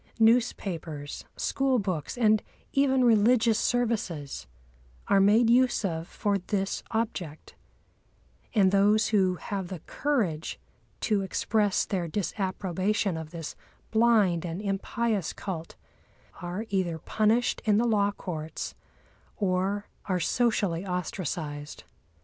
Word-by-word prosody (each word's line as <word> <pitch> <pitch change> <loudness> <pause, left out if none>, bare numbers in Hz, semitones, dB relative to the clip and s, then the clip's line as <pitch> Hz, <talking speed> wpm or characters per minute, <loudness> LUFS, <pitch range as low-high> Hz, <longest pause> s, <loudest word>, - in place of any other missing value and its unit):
Newspapers, 195 -10 0
school 270 -1 +1
books, 185 - -2
and 215 -3 +4 0.3
even 265 -2 +3
religious 225 0 +4
services 215 - -1 0.6
are 200 - +4
made 215 +4 +5
use 245 -2 +3
of 165 -2 -2
for 200 -1 -1
this 195 +1 -2
object; 195 -9 -3 1.0
and 195 -3 +5
those 205 +2 +4
who 190 -4 +3
have 190 +2 -4
the 185 - -5
courage 210 - -1 0.4
to 210 -3 +1
express 205 +1 +1
their 180 -4 -2
disapprobation 190 +1 -1
of 160 -1 -6
this 165 -2 -6 0.4
blind 220 -7 +4
and 170 0 -4
impious 205 0 -1
cult 170 -4 -6 0.7
are 180 +5 -4
either 185 -4 0
punished 220 +8 +1
in 210 -2 +4
the 235 - +3
law 205 -3 +3
courts, 160 -6 -5 0.6
or 195 +1 0 0.2
are 185 -2 0
socially 200 -3 +1
ostracised. 160 -5 -4
200 Hz, 110 wpm, -28 LUFS, 175-220 Hz, 1.0 s, made